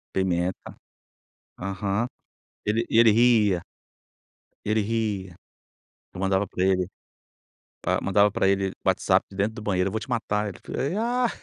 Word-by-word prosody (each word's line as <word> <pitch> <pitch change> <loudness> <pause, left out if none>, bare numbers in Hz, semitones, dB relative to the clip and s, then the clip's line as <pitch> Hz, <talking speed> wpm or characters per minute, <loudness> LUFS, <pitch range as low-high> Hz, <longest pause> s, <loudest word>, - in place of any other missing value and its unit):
Pimenta. 90 -1 -1 0.8
Aham. 100 +4 -1 0.6
Ele 110 +3 +1
e - - +2
ele 115 -1 +7
ria 110 -5 +4 1.0
ele 110 +1 +2
ria. 105 -4 -2 0.8
Eu 90 - -6
mandava 95 +1 +1
pra 90 0 -2
ele, 95 -1 +2 0.9
pa - - 0
mandava 100 +1 +4
pra 95 -1 +1
ele 95 -1 +1
WhatsApp - - +2
de 95 - -12
dentro 105 +3 0
do 110 - -8
banheiro 95 -2 +1
"Eu 95 - -6
vou 110 - -2
te 110 - -9
matar". 105 -2 -1
Ele 95 - -8
fal - - -8 0.3
ah, 245 +1 +1
100 Hz, 145 wpm, -25 LUFS, 95-110 Hz, 1.0 s, ele